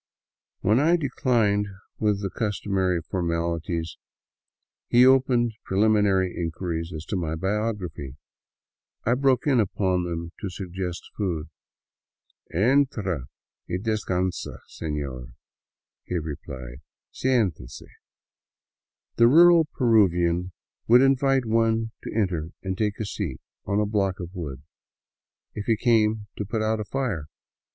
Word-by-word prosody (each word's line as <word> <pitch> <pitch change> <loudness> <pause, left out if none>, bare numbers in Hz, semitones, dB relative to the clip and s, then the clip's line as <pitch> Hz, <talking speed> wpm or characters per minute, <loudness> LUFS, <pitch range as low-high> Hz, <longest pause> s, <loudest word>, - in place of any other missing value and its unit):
When 105 +5 +3
I 165 +5 +4
declined 120 -9 +1 0.3
with 105 -2 +1
the 95 - -2
customary 95 -4 -1
formalities, 85 -1 -2 0.9
he 120 +1 +6
opened 125 -3 +4
pre 95 - -3
liminary 100 -3 +3
inquiries 85 0 -3
as 80 -1 -6
to 105 - -3
my 80 -4 -2
biography. 95 - -3 0.9
I 115 - +3
broke 135 0 +2
in 135 -5 +3
upon 95 -3 +1
them 85 -1 -4
to 100 - -4
sug 90 0 -7
gest 90 -2 -4
food. 85 -6 -2 0.6
" - - -35
Entra 100 - +1 0.4
y 90 - -1
descansa, 95 -4 -2
sefior," 70 -5 -5 0.7
he 90 - -2
replied, 70 -5 -7 0.2
'' - - -69
Sientese." 100 - 0 1.3
The 115 - +7
rural 170 +4 +7
Peruvian 90 - +2 0.4
would 120 +2 +7
invite 135 -1 +3
one 115 0 +1
to - - -6
enter 90 -7 -1
and 95 -1 -2
take 105 0 -1
a 110 - -2
seat 95 -9 -4 0.2
— - - -62
on 100 +1 +1
a 105 - +2
block 100 -2 0
of 90 0 -7
wood 70 -8 -6 0.5
— - - -64
if 105 - -6
he 115 -2 +3
came 110 -2 +2
to - - -2
put 110 +2 -2
out 110 0 0
a 105 - -3
fire. 110 - -2
100 Hz, 130 wpm, -25 LUFS, 85-115 Hz, 1.3 s, The